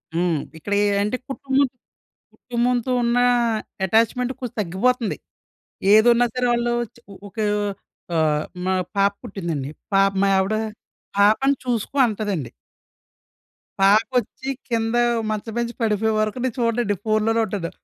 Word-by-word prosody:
హ్మ్. 170 -3 +1 0.2
ఇక్కడేంటే 205 +4 +1
కుటుంబం 270 0 +1 0.7
కుటుంబంతో 245 +1 -1
ఉన్నా 240 +1 +2 0.6
ఎటాచ్‌మెంట్ 230 +4 +2
కొంచెం 250 -2 -6
తగ్గిపోతుంది. 215 +5 0 0.8
ఏదున్నా 240 +2 +6
సరే 250 -1 0
వాళ్ళు 240 0 0 0.2
చ - - -18 0.2
ఒ - - -12
ఒక 230 - -30 0.8
ఆహ్, 155 -2 +2 0.2
మా 190 - +1 0.2
పాప 200 0 +4
పుట్టిందండి, 170 - -4 0.2
పాప్ 195 0 +4
మా - - +4
యావిడ 190 +3 +2 0.6
"పాపను 220 +7 +4
చూసుకో" 245 +3 -2
అంటదండి. 205 - -3 1.3
పాపొచ్చి 230 +6 +2 0.2
కింద 225 0 0 0.3
మంచం 215 +1 -3
మీద్నుంచి 235 0 -2
పడిపోయే 220 0 +1
వరకు 215 +2 -1
నేను 255 -3 -1
చూడనండి 230 -3 +1
ఫోనులోనే 215 +1 +2
ఉంటాను. 190 -5 -4
220 Hz, 115 wpm, -22 LUFS, 200-240 Hz, 1.3 s, ఏదున్నా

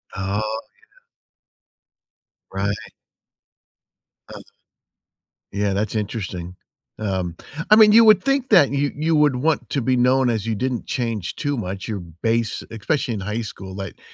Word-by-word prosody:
Oh, 100 +2 -2
yeah. 110 +1 -3 1.9
Right. 100 +1 -3 1.4
Uh-huh. - - -9 1.1
Yeah, 100 0 0
that's 105 +2 -2
interesting. 95 -4 -4 0.4
Um, 95 -5 -2 0.3
I 215 - +8
mean, 215 -1 +8
you 225 +1 +7
would 215 -2 +6
think 275 -1 0
that 175 -10 +6
you 140 0 0
you 160 +2 +1
would 150 -4 +3
want 155 +4 0
to 140 - 0
be 130 +2 +1
known 125 +1 +3
as 110 -4 -1
you 115 -1 -1
didn't 125 +2 -2
change 115 -7 -3
too 145 -1 -2
much. 95 -2 -5
Your 105 -3 -3
base 110 +7 -2
especially 115 +2 -2
in 100 - -5
high 105 +4 -3
school, 95 -4 -8
like, 95 -1 -7
115 Hz, 145 wpm, -22 LUFS, 100-140 Hz, 1.9 s, I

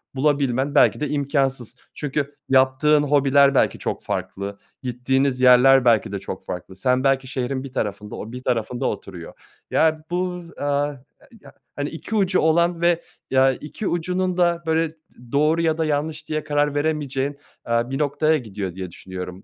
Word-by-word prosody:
bulabilmen 140 -1 +1
belki - - +5
de 150 - -2
imkânsız. 135 -4 -1 0.2
Çünkü 145 0 -3
yaptığın 135 +3 +4
hobiler 140 -1 +4
belki - - +2
çok - - -4
farklı, 100 +1 -4 0.3
gittiğiniz 130 +2 0
yerler 130 +1 +6
belki 115 -4 +3
de 100 - -3
çok 95 -1 -7
farklı. 90 +1 -7
Sen, 125 +6 +1
belki 135 -1 +2
şehrin 130 0 -3
bir 135 -2 -9
tarafında, 105 0 -3
o 110 - -7
bir 125 +1 -8
tarafında 120 -1 -1
oturuyor. 90 -3 -5 0.4
Ya 155 -1 +2
bu, 180 0 -2
aaa, - - -5 0.3
a 140 - -11 0.4
ya, - - -15 0.2
hani, 145 0 -3
2 165 +7 -6
ucu 190 -3 +2
olan 170 +2 +2
ve, 170 -1 +3 0.3
ya, 135 0 +4
2 155 +9 -6
ucunun 180 +1 -1
da 170 -1 +2
böyle 160 0 0 0.4
doğru 155 +3 +2
ya 160 -1 +1
da 160 - 0
yanlış 155 +1 -2
diye 155 0 -2
karar 145 -1 0
veremeyeceğin, 145 -2 -1 0.3
aaa, 115 +1 0
bir 135 - -2
noktaya 150 +2 +2
gidiyor 100 - -6
diye 95 -2 -6
düşünüyorum. 90 +1 -8
140 Hz, 165 wpm, -22 LUFS, 125-155 Hz, 0.4 s, yerler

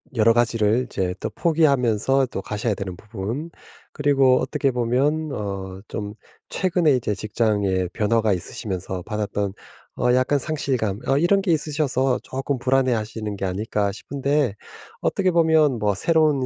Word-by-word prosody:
'여러 115 +1 +5
가지를 115 0 +2
이제 90 -5 -2
또 - - -3
포기하면서 135 - +2
또 100 - -5
가셔야 105 +2 -2
되는 95 -2 -5
부분 110 - -5 0.4
그리고 135 -3 +3
어떻게 140 -3 0
보면 135 +6 0
어 95 -2 -5
좀 105 -1 -5 0.4
최근에 175 -6 +2
이제 105 -4 -1
직장에 100 -3 0
변화가 110 -1 +2
있으시면서 95 0 -4
받았던 105 -2 -2 0.4
어 125 0 +2
약간 130 +3 +2
상실감 125 -9 -1
어 135 - +3
이런 195 +5 +3
게 185 -3 0
있으셔서 145 -4 +1
쪼끔 135 +1 -3
불안해하시는 115 -5 0
게 95 - -3
아닐까?' 100 +1 -1
싶은데 140 +1 -1 0.5
어떻게 190 -2 +1
보면 160 -6 +3
뭐 105 -1 +1
새로운 155 - +2
120 Hz, 320 characters per minute, -23 LUFS, 105-145 Hz, 0.5 s, 여러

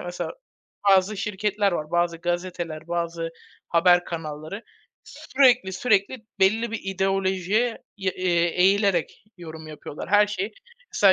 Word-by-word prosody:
mesela 175 0 -5 0.6
bazı 195 +2 +4
şirketler 205 0 0
var, 155 -3 -3
bazı 175 -1 +1
gazeteler, 175 -2 -4
bazı 170 -1 -2 0.4
haber 175 +1 +4
kanalları; 160 +4 -6 0.4
sürekli 250 -8 +2
sürekli 200 +3 +1 0.2
belli 220 +4 +3
bir 225 - -3
ideolojiye, 195 +4 0 0.2
ya, 190 -2 -1
eee, 175 -2 +1 0.2
eğilerek 195 -2 +2
yorum 160 -2 -9
yapıyorlar 150 0 -8
her 205 0 +6
şey. 205 0 -3 0.4
Mesela 195 -2 +6
185 Hz, 120 wpm, -24 LUFS, 170-205 Hz, 0.6 s, her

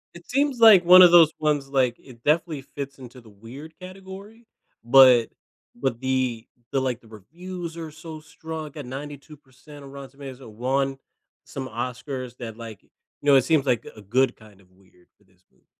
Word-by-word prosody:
It 170 - -14
seems 275 -1 0
like 220 -5 +8
one 185 +1 +9
of 175 - +7
those 165 -3 +7
ones 150 -3 0
like 130 -3 +1
it 120 -3 -17
definitely 155 -1 0
fits 140 0 -8
into 125 -1 -13
the 115 - -18
weird 120 +10 -12
category, 195 +4 -12 0.4
but 125 -1 +6 0.5
but 120 -1 -3
the 130 -3 -2 0.3
the 135 - +1
like, 125 -3 -2
the 115 - -20
reviews 170 - -9
are 165 -1 -7
so 155 0 -10
strong, 160 +1 -8
like, 150 0 -11
at 145 - -7
92% 145 +1 -11
of 135 - -12
Rotten 140 -1 -10
Tomatoes, 135 -2 -11
won 130 +4 -2 0.5
some 135 -1 -7
Oscars 125 +1 -6
that 115 -3 -8
like, 115 -3 -10
you - - -32 0.3
know, 145 -1 +4
it 130 - +5
seems 155 -2 +1
like 120 -3 0
a 105 - -13
good 125 +5 0
kind 105 -3 -19
of 90 - -27
weird 95 -1 -27
for - - -31
this 90 -1 -33
movie. - - -36
135 Hz, 185 wpm, -24 LUFS, 120-155 Hz, 0.5 s, one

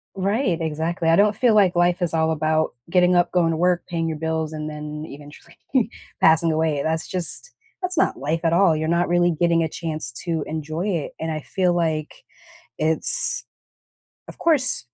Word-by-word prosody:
Right, 195 -1 0
exactly, 165 +1 -2
I 165 - +5
don't 210 +2 +3
feel 230 +1 +2
like 195 -4 +4
life 175 +1 +1
is 175 - 0
all 160 0 +1
about 155 0 0 0.2
getting 180 0 +3
up, 175 0 +2
going 175 -2 +2
to 165 - -1
work, 180 +1 +1
paying 165 -1 -2
your 160 -1 -4
bills, 160 0 -2
and 155 -1 -5
then 150 0 -7
eventually 145 +4 -14 0.6
passing 160 +1 +4
away. 155 -2 0
That's 160 +1 -2
just 185 - -2 0.3
that's 365 -1 -3
not - - +1
life 155 +5 -2
at 165 - +2
all, 170 -2 +4
you're 155 +1 -2
not 170 +1 +1
really 175 0 +2
getting 170 -1 +3
a 160 - -1
chance 155 -7 -5
to 165 -4 -2
enjoy 155 +3 -4
it, 170 -7 -2
and 160 - -4
I 155 - -4
feel 180 +3 0
like 160 -3 -1 0.7
it's 160 - +4 0.8
Of - - -11
course, 295 - +2
165 Hz, 185 wpm, -22 LUFS, 155-180 Hz, 0.8 s, I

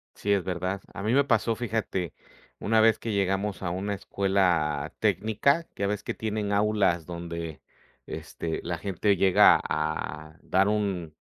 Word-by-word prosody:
Sí, 100 - -2
es 95 -3 +1
verdad. 95 +1 -3
A 100 - -6
mí 110 +3 +1
me 140 +1 +5
pasó 115 -3 +1
fíjate, 110 -7 -2 0.5
una 110 +1 +3
vez 110 -1 +4
que 115 - -4
llegamos 100 +1 -1
a 90 - -1
una 100 +3 -2
escuela 90 -9 0
técnica 140 +10 +1
ya 100 - -1
ves 105 0 -2
que - - -3
tienen 105 -2 -3
aulas 100 -5 +2
donde 85 -3 -6 0.4
este 80 -1 -5
la 85 0 -3
gente 100 +2 +1
llega 95 0 +6
a 75 0 -3
dar 95 +2 +2
un 95 -7 -1
100 Hz, 155 wpm, -27 LUFS, 85-105 Hz, 0.5 s, llega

